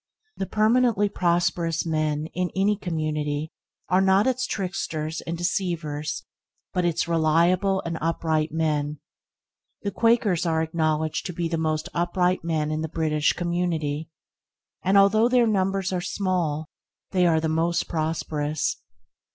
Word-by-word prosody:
The 190 Hz, -, -3 dB
permanently 220 Hz, -1 st, +3 dB
prosperous 170 Hz, -3 st, 0 dB
men 155 Hz, -2 st, 0 dB
in 180 Hz, 0 st, -1 dB
any 200 Hz, +2 st, +3 dB
community 155 Hz, -4 st, -2 dB, 0.4 s
are 185 Hz, +1 st, +3 dB
not 195 Hz, +1 st, +4 dB
its 255 Hz, 0 st, 0 dB
tricksters 160 Hz, -5 st, -3 dB
and 170 Hz, 0 st, -2 dB
deceivers, 170 Hz, -5 st, -2 dB, 0.5 s
but 180 Hz, -1 st, +1 dB
its 170 Hz, -1 st, 0 dB
reliable 170 Hz, +4 st, +2 dB
and 165 Hz, -1 st, -3 dB
upright 160 Hz, -1 st, 0 dB
men. 150 Hz, -2 st, -1 dB, 0.8 s
The 200 Hz, -, -1 dB
Quakers 230 Hz, -6 st, +2 dB
are 160 Hz, -2 st, +1 dB
acknowledged 155 Hz, 0 st, -1 dB
to 180 Hz, -, -5 dB
be 170 Hz, 0 st, -2 dB
the 165 Hz, 0 st, -2 dB
most 155 Hz, -1 st, -1 dB
upright 180 Hz, +1 st, +1 dB
men 155 Hz, -2 st, -1 dB
in 155 Hz, 0 st, -1 dB
the 160 Hz, -, -3 dB
British 155 Hz, -2 st, +1 dB
community, 165 Hz, -4 st, -2 dB, 0.7 s
and, 195 Hz, +2 st, +3 dB
although 215 Hz, +4 st, +5 dB
their 250 Hz, -1 st, +4 dB
numbers 195 Hz, -3 st, 0 dB
are 180 Hz, -, -1 dB
small, 175 Hz, -5 st, -1 dB, 0.5 s
they 180 Hz, -2 st, +3 dB
are 160 Hz, -2 st, +3 dB
the 160 Hz, -, -1 dB
most 165 Hz, +2 st, 0 dB
prosperous. 155 Hz, -2 st, -2 dB
170 Hz, 135 wpm, -25 LUFS, 155-190 Hz, 0.8 s, although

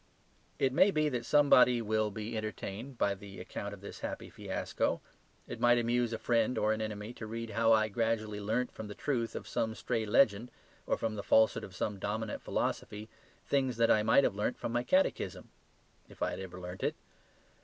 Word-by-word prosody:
It 130 Hz, -1 st, +1 dB
may 190 Hz, -, +6 dB
be 155 Hz, -4 st, +1 dB
that 120 Hz, -3 st, -3 dB
somebody 125 Hz, -4 st, +6 dB
will 110 Hz, -1 st, 0 dB
be 110 Hz, +2 st, -5 dB
entertained 110 Hz, +3 st, -5 dB
by 100 Hz, -, +2 dB
the 100 Hz, 0 st, -10 dB
account 100 Hz, +2 st, -6 dB
of 100 Hz, -1 st, -10 dB
this 100 Hz, -, -9 dB
happy -, -, -5 dB
fiasco. -, -, -2 dB, 0.5 s
It -, -, -6 dB
might 120 Hz, 0 st, +5 dB
amuse 120 Hz, 0 st, +1 dB
a 115 Hz, -, -2 dB
friend 115 Hz, +2 st, +1 dB
or 110 Hz, +1 st, +2 dB
an 110 Hz, -, -3 dB
enemy 105 Hz, +1 st, -5 dB
to 110 Hz, -, -8 dB
read 115 Hz, 0 st, -5 dB
how 115 Hz, 0 st, +3 dB
I 110 Hz, -1 st, +4 dB
gradually 110 Hz, -1 st, -1 dB
learnt 115 Hz, +5 st, -1 dB
from 110 Hz, -, -8 dB
the 105 Hz, -, -8 dB
truth 120 Hz, -6 st, -2 dB
of -, -, -6 dB
some 110 Hz, 0 st, -1 dB
stray 110 Hz, 0 st, -2 dB
legend 110 Hz, +1 st, +3 dB, 0.4 s
or -, -, +1 dB
from 110 Hz, -1 st, -2 dB
the -, -, -2 dB
falsehood 110 Hz, +2 st, +3 dB
of 95 Hz, -, -9 dB
some 100 Hz, +2 st, -2 dB
dominant 110 Hz, +2 st, -3 dB
philosophy, 105 Hz, +1 st, -3 dB, 0.4 s
things 130 Hz, -4 st, +1 dB
that 115 Hz, 0 st, +4 dB
I 105 Hz, -, +5 dB
might 115 Hz, +6 st, +5 dB
have 115 Hz, -, +2 dB
learnt 105 Hz, +5 st, -1 dB
from -, -, -4 dB
my 120 Hz, +1 st, +1 dB
catechism 185 Hz, +9 st, 0 dB, 0.6 s
if -, -, -6 dB
I -, -, 0 dB
had -, -, -5 dB
ever 95 Hz, -1 st, -7 dB
learnt 90 Hz, +1 st, -7 dB
it. -, -, 0 dB
110 Hz, 200 wpm, -32 LUFS, 105-120 Hz, 0.6 s, may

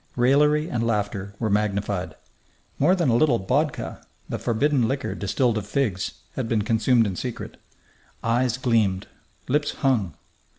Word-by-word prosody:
Raillery 150 Hz, +5 st, +3 dB
and 120 Hz, -9 st, -2 dB
laughter 105 Hz, -3 st, -2 dB
were 110 Hz, -, -1 dB
magnified. 100 Hz, -4 st, -1 dB, 0.6 s
More 175 Hz, +7 st, +4 dB
than 170 Hz, -7 st, +1 dB
a 115 Hz, -, +3 dB
little 125 Hz, -1 st, +4 dB
bokha, 135 Hz, +9 st, -1 dB, 0.2 s
the -, -, -4 dB
forbidden 125 Hz, +1 st, +1 dB
liquor 135 Hz, +2 st, -2 dB
distilled 110 Hz, +5 st, 0 dB
of 105 Hz, -, -9 dB
figs, 105 Hz, -7 st, -1 dB, 0.2 s
had 125 Hz, -4 st, -3 dB
been 110 Hz, -3 st, +1 dB
consumed 115 Hz, +2 st, +3 dB
in 95 Hz, -3 st, -2 dB
secret. 125 Hz, +4 st, -6 dB, 0.7 s
Eyes 120 Hz, +1 st, +1 dB
gleamed; 110 Hz, -7 st, +1 dB, 0.4 s
lips 145 Hz, +2 st, +1 dB
hung.... 120 Hz, -, 0 dB
115 Hz, 140 wpm, -24 LUFS, 105-135 Hz, 0.7 s, More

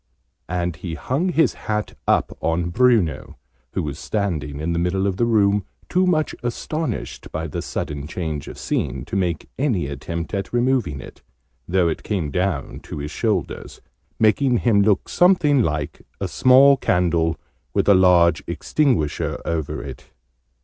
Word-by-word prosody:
And 90 Hz, -2 st, -2 dB
he 85 Hz, -1 st, -5 dB
hung 145 Hz, -, -1 dB
his 165 Hz, -2 st, +3 dB
hat 105 Hz, -1 st, -3 dB
up -, -, +2 dB
on 85 Hz, +1 st, 0 dB
Bruno, 115 Hz, -7 st, +2 dB, 0.4 s
who -, -, -1 dB
was 75 Hz, -1 st, -5 dB
standing 80 Hz, -9 st, -2 dB
in 80 Hz, +2 st, -1 dB
the 85 Hz, -, 0 dB
middle 90 Hz, +3 st, 0 dB
of 95 Hz, -2 st, -1 dB
the 120 Hz, -, +2 dB
room, 105 Hz, -3 st, +3 dB, 0.3 s
too 185 Hz, +1 st, +2 dB
much 155 Hz, -4 st, +1 dB
astonished 125 Hz, +2 st, -4 dB
by 80 Hz, +1 st, -3 dB
the 75 Hz, -, -4 dB
sudden 75 Hz, -1 st, -4 dB
change 80 Hz, -4 st, -4 dB
of -, -, -8 dB
scene 65 Hz, -1 st, -2 dB
to 90 Hz, -, -6 dB
make 90 Hz, -5 st, -1 dB
any 120 Hz, -, +1 dB
attempt 80 Hz, +6 st, -5 dB
at 100 Hz, -1 st, -3 dB
removing 120 Hz, -, +1 dB
it, -, -, -12 dB, 0.5 s
though 90 Hz, -1 st, +2 dB
it 80 Hz, -, -2 dB
came 90 Hz, -9 st, -2 dB
down 90 Hz, -3 st, -2 dB
to -, -, -8 dB
his 75 Hz, +1 st, -5 dB
shoulders, -, -, -2 dB, 0.4 s
making 120 Hz, +3 st, +3 dB
him 110 Hz, -3 st, +3 dB
look 100 Hz, -1 st, +2 dB
something 165 Hz, -7 st, +4 dB
like 75 Hz, -7 st, -2 dB, 0.2 s
a -, -, -2 dB
small 135 Hz, +2 st, +6 dB
candle 85 Hz, -6 st, +1 dB, 0.4 s
with -, -, +2 dB
a 100 Hz, -, +8 dB
large 90 Hz, -2 st, +5 dB
extinguisher 125 Hz, -, 0 dB
over 80 Hz, -3 st, -2 dB
it. 65 Hz, -3 st, -10 dB
90 Hz, 155 wpm, -22 LUFS, 80-120 Hz, 0.5 s, a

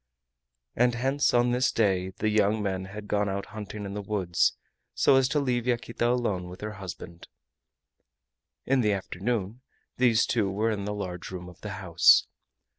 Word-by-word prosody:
And 120 Hz, 0 st, +3 dB
hence 135 Hz, +4 st, +1 dB
on 120 Hz, 0 st, +3 dB
this 125 Hz, +1 st, +2 dB
day 95 Hz, -4 st, +1 dB
the 105 Hz, +3 st, -2 dB
young 105 Hz, 0 st, +2 dB
men 95 Hz, -1 st, -2 dB
had 105 Hz, +2 st, -9 dB
gone 105 Hz, -1 st, 0 dB
out 100 Hz, 0 st, -3 dB
hunting 105 Hz, -1 st, -7 dB
in 100 Hz, -, -6 dB
the 105 Hz, -, -4 dB
woods, 95 Hz, -4 st, 0 dB, 0.4 s
so -, -, +4 dB
as 135 Hz, -1 st, +4 dB
to 150 Hz, -, +1 dB
leave 125 Hz, -3 st, -1 dB
Yaquita 120 Hz, -1 st, 0 dB
alone 105 Hz, -8 st, -1 dB
with 90 Hz, -, -11 dB
her 105 Hz, 0 st, -4 dB
husband. 85 Hz, -2 st, -9 dB, 1.4 s
In 135 Hz, -1 st, +2 dB
the 105 Hz, -3 st, +2 dB
afternoon 100 Hz, +4 st, -3 dB, 0.4 s
these 120 Hz, -3 st, +4 dB
two 110 Hz, -5 st, 0 dB
were 110 Hz, +4 st, 0 dB
in 100 Hz, -2 st, -3 dB
the 105 Hz, 0 st, -3 dB
large 90 Hz, -3 st, -5 dB
room 90 Hz, -1 st, -7 dB
of 90 Hz, -, -14 dB
the 105 Hz, -2 st, -5 dB
house. 85 Hz, -5 st, +5 dB
105 Hz, 175 wpm, -27 LUFS, 95-120 Hz, 1.4 s, house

